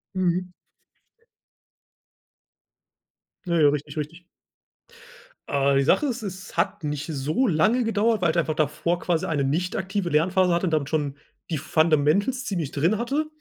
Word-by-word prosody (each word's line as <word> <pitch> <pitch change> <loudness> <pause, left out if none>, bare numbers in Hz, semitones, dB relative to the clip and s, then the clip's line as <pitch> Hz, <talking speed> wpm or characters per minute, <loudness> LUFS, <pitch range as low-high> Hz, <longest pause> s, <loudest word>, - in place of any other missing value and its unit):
Mhm. 180 0 0 2.9
Ja, 170 -2 +1
ja, 150 -2 +6
richtig, 145 0 -3
richtig. 165 +4 -5 1.2
Äh, 140 0 +2
die 135 - +3
Sache 225 - +3
ist, 250 -3 -3
es 195 -1 -8
hat 170 - 0
nicht 150 -1 -3
so 155 - 0
lange 215 +8 +2
gedauert, 225 -1 +1
weil 170 -3 +3
ich 170 - -4
einfach 155 -2 0
davor 165 +3 0
quasi 170 -2 0
eine 145 -4 0
nicht 165 +7 -1
aktive 190 -1 -2
Lernphase 180 +3 +2
hatte 175 +2 +1
und - - -1
damit 150 -3 0
schon 145 -3 -1 0.3
die 160 - -1
Fundamentals 160 - +2
ziemlich 170 -8 -3
drin 170 +9 +1
hatte. 275 +7 -1
170 Hz, 150 wpm, -24 LUFS, 150-190 Hz, 2.9 s, ja